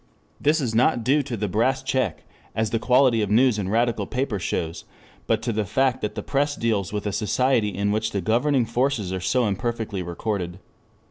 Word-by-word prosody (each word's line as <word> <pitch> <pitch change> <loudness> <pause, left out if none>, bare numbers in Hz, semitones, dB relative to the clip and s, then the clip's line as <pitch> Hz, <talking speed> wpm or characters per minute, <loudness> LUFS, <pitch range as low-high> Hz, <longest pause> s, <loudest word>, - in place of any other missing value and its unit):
This 150 +3 +2
is 125 -6 -2
not 120 0 +3
due 140 +5 +3
to 130 -4 -5
the 105 0 -1
Brass 130 +7 +1
Check, 130 -11 -1 0.3
as 110 -1 0
the 115 - +1
quality 125 -1 +4
of 105 - -1
news 115 +1 +4
in 95 -2 -2
radical 115 -1 +1
papers 125 -7 -2
shows, 85 -1 -3 0.4
but 110 -1 +1
to 120 - -1
the 105 0 0
fact 130 +5 +1
that 105 0 -3
the - - -4
press 145 +1 0
deals 105 -6 -1
with 105 0 -3
a 105 - 0
society 115 +2 +1
in 100 +1 -1
which 110 +1 0
the 100 - -2
governing 120 - +2
forces 115 -5 -1
are 95 - -2
so 125 +7 +1
imperfectly 110 0 -2
recorded. 90 0 -3
110 Hz, 200 wpm, -24 LUFS, 100-130 Hz, 0.4 s, quality